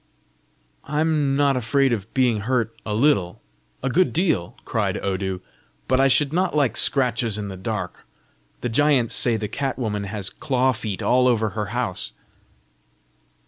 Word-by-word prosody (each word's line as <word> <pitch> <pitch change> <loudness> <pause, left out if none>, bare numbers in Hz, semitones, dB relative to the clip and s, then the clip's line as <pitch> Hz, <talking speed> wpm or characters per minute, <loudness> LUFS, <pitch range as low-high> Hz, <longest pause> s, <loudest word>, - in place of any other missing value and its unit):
"I'm 150 -2 +1
not 140 -1 +3
afraid 130 +2 +2
of 105 -1 -4
being 125 -5 +3
hurt 115 0 -1
a 105 - -1
little! 110 -8 +2 0.4
a 135 - 0
good 185 +7 +2
deal!" 155 - 0
cried - - -1
Odu. 95 -1 -2 0.5
"But 130 +1 +2
I 135 - +5
should 140 +2 +2
not 180 -1 +1
like 135 -7 +2
scratches 120 -5 +1
in 105 -1 -4
the 95 - -6
dark! 95 - -5 0.5
The 125 - -2
giants 135 -1 +3
say 120 -3 +3
the 105 -1 -3
cat 135 +5 -3
woman 105 -5 -2
has 100 -1 -4
claw 130 -2 +1
feet 110 -5 -4
all 125 0 +4
over 110 -3 +2
her 105 +1 -4
house!" 115 -3 -3
120 Hz, 155 wpm, -23 LUFS, 105-140 Hz, 0.5 s, I